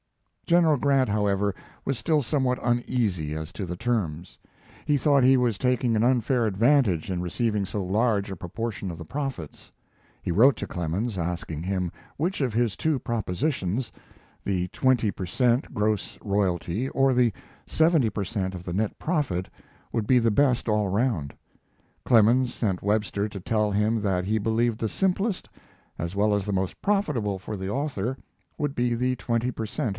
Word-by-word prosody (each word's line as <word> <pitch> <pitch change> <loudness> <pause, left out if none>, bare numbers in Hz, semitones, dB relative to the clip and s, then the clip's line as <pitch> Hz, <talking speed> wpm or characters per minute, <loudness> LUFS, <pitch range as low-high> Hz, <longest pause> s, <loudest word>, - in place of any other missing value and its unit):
General 170 -3 +4
Grant, 135 -1 +2
however, 100 -1 +1 0.3
was 135 - -1
still 155 +2 +1
somewhat 130 -1 0
uneasy 115 -10 0
as 80 +2 -6
to 100 - -4
the 90 0 -5
terms. 90 -8 -2 0.5
He 150 -1 +3
thought 140 -1 +3
he 130 +1 +6
was 120 -5 +1
taking 125 -1 +1
an 110 - +2
unfair 125 0 +2
advantage 110 - +2
in 90 -2 -2
receiving 105 +3 -1
so 100 +2 -3
large 105 +1 +1
a 95 - -4
proportion 100 +2 -4
of 85 - -8
the 85 - -8
profits. 135 - -5 0.5
He - - -2
wrote 125 +10 +5
to - - -4
Clemens, 90 +6 -2
asking 85 -2 -3
him 90 -1 -1 0.3
which 170 +3 -1
of 130 -3 +1
his 115 -3 +1
two 155 -4 0
propositions 115 - -2 0.5
the 90 -2 -1
twenty 125 -2 +2
per 95 - -5
cent. 120 +8 +1
gross 105 -2 -1
royalty 100 +3 -1
or 135 -1 +3
the 125 -2 +3 0.3
seventy 160 -7 +3
per 100 -1 -3
cent. 95 0 -2
of 90 -1 -8
the 85 - -4
net 105 +3 -1
profit 140 - -1 0.5
would 110 -2 -1
be 125 0 +5
the 115 -1 +2
best 125 +1 +2
all 105 -2 +2
around. 95 - 0 0.7
Clemens 120 +2 +4
sent 95 -6 -1
Webster 105 0 0
to 100 - -7
tell 105 +2 0
him 105 +2 +1
that 95 -3 0
he 110 +3 +1
believed 115 +1 0
the 110 - -1
simplest, 195 - 0 0.5
as 85 +2 -4
well 105 +1 +2
as 100 -2 -1
the 105 - -2
most 95 -1 -2
profitable 145 - 0
for 105 +3 -6
the 95 -1 -4
author, 130 -1 -2 0.4
would 145 -1 -2
be 120 -1 +1
the 125 +2 0
twenty 120 0 -1
per 110 -2 -4
cent. 110 +2 -2
110 Hz, 170 wpm, -26 LUFS, 95-125 Hz, 0.7 s, he